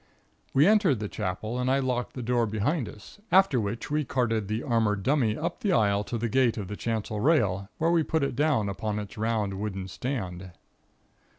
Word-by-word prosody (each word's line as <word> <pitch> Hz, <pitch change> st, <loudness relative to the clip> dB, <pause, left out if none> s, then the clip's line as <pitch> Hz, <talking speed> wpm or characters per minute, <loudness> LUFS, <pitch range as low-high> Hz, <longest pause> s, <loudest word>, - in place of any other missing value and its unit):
We 140 Hz, +3 st, +5 dB
entered 200 Hz, -, +4 dB
the 105 Hz, -, -3 dB
Chapel 110 Hz, +6 st, -3 dB
and 125 Hz, 0 st, 0 dB
I 135 Hz, -, +3 dB
locked 125 Hz, -2 st, -1 dB
the 125 Hz, -, -5 dB
door 120 Hz, -1 st, +1 dB
behind 110 Hz, -, -1 dB
us, 105 Hz, -, -13 dB
after 185 Hz, -10 st, +5 dB
which 110 Hz, +6 st, -4 dB
we 150 Hz, 0 st, +1 dB
carted 115 Hz, -5 st, 0 dB
the 110 Hz, +3 st, -2 dB
armored 110 Hz, -6 st, +1 dB
dummy 120 Hz, -4 st, +2 dB
up 160 Hz, -, -3 dB
the 205 Hz, -7 st, +1 dB
aisle 100 Hz, -4 st, +3 dB
to 120 Hz, -, -3 dB
the 115 Hz, +1 st, -1 dB
gate 125 Hz, 0 st, +2 dB
of 100 Hz, -4 st, -5 dB
the 105 Hz, -, -4 dB
chancel 110 Hz, -1 st, -3 dB
rail 105 Hz, -, +2 dB
where 165 Hz, +2 st, +2 dB
we 170 Hz, -1 st, +4 dB
put 160 Hz, -1 st, 0 dB
it 140 Hz, -, -1 dB
down 145 Hz, -7 st, +2 dB
upon 105 Hz, +1 st, -3 dB
its 105 Hz, -1 st, -6 dB
round, 105 Hz, -3 st, -1 dB
wooden 95 Hz, -3 st, -4 dB
stand. 95 Hz, -6 st, -5 dB
115 Hz, 200 wpm, -27 LUFS, 105-135 Hz, -, We